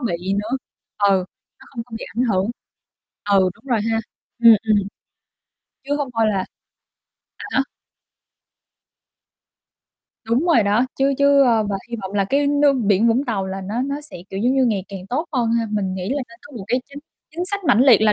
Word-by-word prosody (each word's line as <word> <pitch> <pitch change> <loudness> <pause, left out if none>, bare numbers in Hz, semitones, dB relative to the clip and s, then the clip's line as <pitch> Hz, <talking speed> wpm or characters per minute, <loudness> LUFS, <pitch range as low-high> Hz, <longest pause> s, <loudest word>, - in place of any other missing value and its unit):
bị 185 -5 -2
nữa. 225 +6 -2 0.4
Ừ. 195 -2 +3 0.4
Nó - - -16
không 235 -3 -6
có 245 - -23
bị - - -6
ảnh 250 - +2
hưởng. 200 -2 +1 0.8
Ừ, 190 -2 +4
đúng - - -25
rồi 235 -5 +1
ha. 225 - +1 0.4
Ừm, 230 -2 +8
ừm. 215 - +4 1.1
Chứ 285 +1 -1
hông 285 -3 -2
thôi 225 0 +2
là 195 -3 -1 0.9
À - - -8
há. 270 - +2 2.6
Đúng 235 +7 +1
rồi 320 -11 +5
đó, 210 +5 +2
chứ 275 +1 +3
chứ 280 0 +5
ơ, 230 -4 +3
và 195 - 0
hy 235 - -3
vọng 190 +1 -6
là 200 -1 +1
cái 280 +7 +1
nước 285 0 +4
biển 220 -3 +2
Vũng 245 +5 +2
Tàu 200 -6 -2
là 190 0 -5
nó 210 +6 -3
nó 280 +2 -3
sẽ, 300 - -8
kiểu, 195 - -4
giống 245 +4 +2
như, 265 -1 +3
ngày 205 -6 0
càng 190 -1 -8
tốt 300 - -2
hơn 240 -4 +1
ha. 230 -1 +1
Mình 195 -3 -1
nghĩ 185 0 -4
là 280 +2 -1
nên 235 0 -16
có 285 -4 -12
một 195 - -7
cái 250 +2 +1
chính 280 - -9 0.3
chính 340 +3 -3
sách 395 +1 -3
mãnh 250 -7 +4
liệt 255 -6 +7
là 215 -1 +4
230 Hz, 200 wpm, -21 LUFS, 200-275 Hz, 2.6 s, Ừm